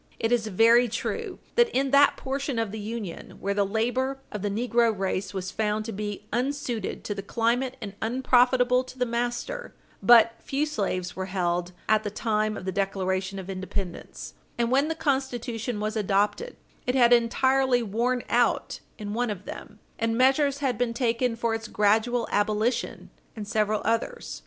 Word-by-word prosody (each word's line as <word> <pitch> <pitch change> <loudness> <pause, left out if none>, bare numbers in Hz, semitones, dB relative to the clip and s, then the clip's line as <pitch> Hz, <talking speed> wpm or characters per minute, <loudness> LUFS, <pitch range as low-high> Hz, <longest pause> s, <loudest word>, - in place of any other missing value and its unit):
It 225 - -1
is 235 -3 +2
very 230 +4 +5
true 390 - -4 0.2
that, 475 0 +4
in 270 0 +1
that 280 0 +5
portion 275 -1 -3
of 225 -3 -1
the 220 - -6
Union 210 -4 -6
where 200 +1 -1
the 200 0 +2
labor 245 +6 -1
of 210 - -5
the 205 - -1
negro 230 +1 +1
race 190 0 -2
was 190 -1 -4
found 215 0 -1
to 225 - -4
be 205 0 -5
unsuited 245 -3 -2
to 205 - -3
the 200 - -5
climate 240 +5 0
and 200 -3 -6
unprofitable 250 +1 +3
to 255 0 -12
the 250 - +1
master, 240 - -3 0.3
but 230 -1 +7
few 280 +2 -1
slaves 195 -10 -2
were 190 0 -4
held 180 -2 -1 0.2
at 215 0 +4
the 205 - -2
time 215 0 -1
of - - -8
the 190 - -1
Declaration 190 0 -1
of 190 -1 -7
Independence, 190 -1 -6 0.2
and 235 0 0
when 275 +3 +3
the 325 - -2
Constitution 250 -6 -2
was 215 +1 -2
adopted, 210 - 0 0.3
it 250 - +1
had 245 -2 +6
entirely 255 +1 +3
worn 235 +4 0
out - - +1 0.2
in 205 -2 -5
one 240 +1 0
of 200 -2 -5
them, - - -9 0.2
and 225 0 0
measures 275 +2 +3
had 250 -4 0
been 235 -2 0
taken 235 0 +1
for 230 0 -1
its 225 0 -4
gradual 220 +4 +2
abolition 215 +4 0 0.2
in 215 -2 -6
several 215 0 0
others. 230 - -2
230 Hz, 175 wpm, -26 LUFS, 205-250 Hz, 0.3 s, but